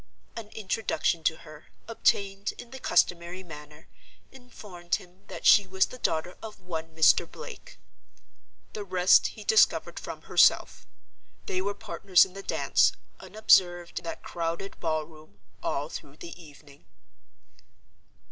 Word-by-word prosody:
An 230 -2 -7
introduction 190 -5 -1
to 160 - +2
her, 155 0 -13 0.2
obtained 200 -3 0
in 245 0 -11
the 265 - -9
customary 175 -2 0
manner, 150 -2 -12 0.4
informed 205 -9 -6
him 180 +1 -13
that - - -9
she 205 -3 +6
was 190 +1 +2
the 255 - -12
daughter 170 0 -2
of 220 -1 -9
one 165 -3 -7
Mr. 160 -1 +4
Blake. - - -11 1.0
The 210 - -5
rest 185 -1 +4
he 215 - -10
discovered 220 +1 +3
from - - -8
herself. - - +3 0.6
They 185 - -2
were 200 +1 -3
partners 180 0 +3
in 185 - -14
the 195 - -8
dance - - +2 0.3
(unobserved 175 -5 +2
in - - -19
that 165 - -6
crowded 170 +3 -5
ball 155 -2 -1
room) 155 -9 -18 0.2
all 145 +1 -2
through 145 -2 -10
the 170 - -9
evening. 145 -2 -17
180 Hz, 140 wpm, -27 LUFS, 160-200 Hz, 1.0 s, she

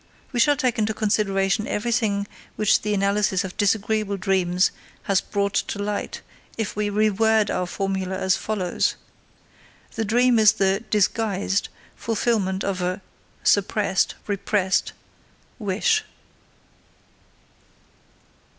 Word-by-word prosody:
We 245 - -2
shall 290 +5 +5
take 255 -4 0
into 215 0 0
consideration 205 -1 +1
everything 210 -2 0 0.3
which 215 -2 +3
the 210 0 -1
analysis 200 0 +1
of 190 -1 -7
disagreeable 210 0 0
dreams 185 -1 +1 0.3
has 195 -1 +2
brought 200 -1 -2
to - - -1
light 205 0 -3 0.4
if 220 -2 -3
we 210 0 -1
reword 215 +1 +2
our 180 -1 -1
formula 190 0 -2
as 190 -1 +2
follows: 195 -5 -1 1.0
The 225 - -2
dream 240 +2 +3
is 215 -1 +6
the 195 +2 +1
(disguised) 205 -1 0 0.3
fulfillment 210 -4 -1
of 190 -2 -2
a 180 +2 -1 0.4
(suppressed, 200 -1 +2
repressed) 200 -1 0 0.7
wish. 220 - +1
205 Hz, 110 wpm, -23 LUFS, 195-220 Hz, 1.0 s, is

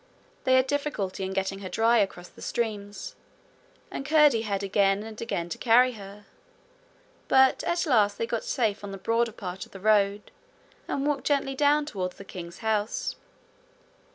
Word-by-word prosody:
They 260 - +5
had 260 0 +4
difficulty 265 -10 -2
in 190 - -3
getting 195 0 -2
her 190 -2 -6
dry 230 +3 +3
across 180 -3 -2
the - - -17
streams, 205 -4 -3 0.8
and - - -4
Curdie 295 -5 +4
had 200 -3 -2
again 195 0 +2
and 220 -1 -9
again 175 -7 -2
to - - -5
carry 250 +2 +5
her, 205 -2 -11 1.0
but 265 0 +4
at 345 +1 0
last 220 -8 +3
they 460 - -1
got - - -3
safe 225 - -1
on 200 - -6
the 195 - -6
broader 230 +4 0
part 185 -2 -7
of - - -23
the 195 - -9
road, 205 0 +2 0.6
and 275 - -2
walked 290 -2 -1
gently 275 -2 +1
down 290 +2 +3
towards 185 -10 -4
the 200 - -10
king's 175 -1 -8
house. 215 -1 -1
215 Hz, 170 wpm, -27 LUFS, 195-265 Hz, 1.0 s, They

